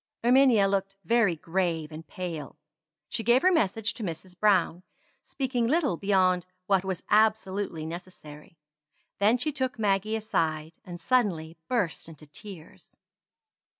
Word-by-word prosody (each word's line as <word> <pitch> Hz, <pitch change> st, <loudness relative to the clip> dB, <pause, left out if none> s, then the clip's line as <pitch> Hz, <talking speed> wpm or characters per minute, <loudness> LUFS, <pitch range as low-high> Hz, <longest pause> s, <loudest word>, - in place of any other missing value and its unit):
Erminia 245 Hz, -4 st, +5 dB
looked 195 Hz, 0 st, -1 dB
very 220 Hz, -3 st, +3 dB
grave 165 Hz, -1 st, -2 dB
and 155 Hz, +1 st, -9 dB
pale. 170 Hz, -5 st, -6 dB, 0.5 s
She 230 Hz, -, -3 dB
gave 240 Hz, +4 st, +4 dB
her 370 Hz, -, +5 dB
message 225 Hz, -, +1 dB
to 230 Hz, -, -7 dB
Mrs. 180 Hz, 0 st, -6 dB
Browne, 185 Hz, -4 st, +2 dB, 0.4 s
speaking 250 Hz, -4 st, -1 dB
little 295 Hz, -, +2 dB
beyond 185 Hz, -1 st, +2 dB, 0.2 s
what 195 Hz, -1 st, +2 dB
was 190 Hz, -2 st, -4 dB
absolutely 205 Hz, -6 st, +1 dB
necessary. 160 Hz, -2 st, -10 dB, 0.6 s
Then 215 Hz, +4 st, +4 dB
she 305 Hz, +5 st, -1 dB
took 260 Hz, -2 st, -2 dB
Maggie 210 Hz, 0 st, +1 dB
aside, 160 Hz, -7 st, -2 dB
and 175 Hz, -1 st, -9 dB
suddenly 170 Hz, -9 st, 0 dB
burst 205 Hz, -9 st, -1 dB
into 155 Hz, -1 st, -12 dB
tears. 160 Hz, +3 st, -13 dB
195 Hz, 130 wpm, -27 LUFS, 170-225 Hz, 0.6 s, Erminia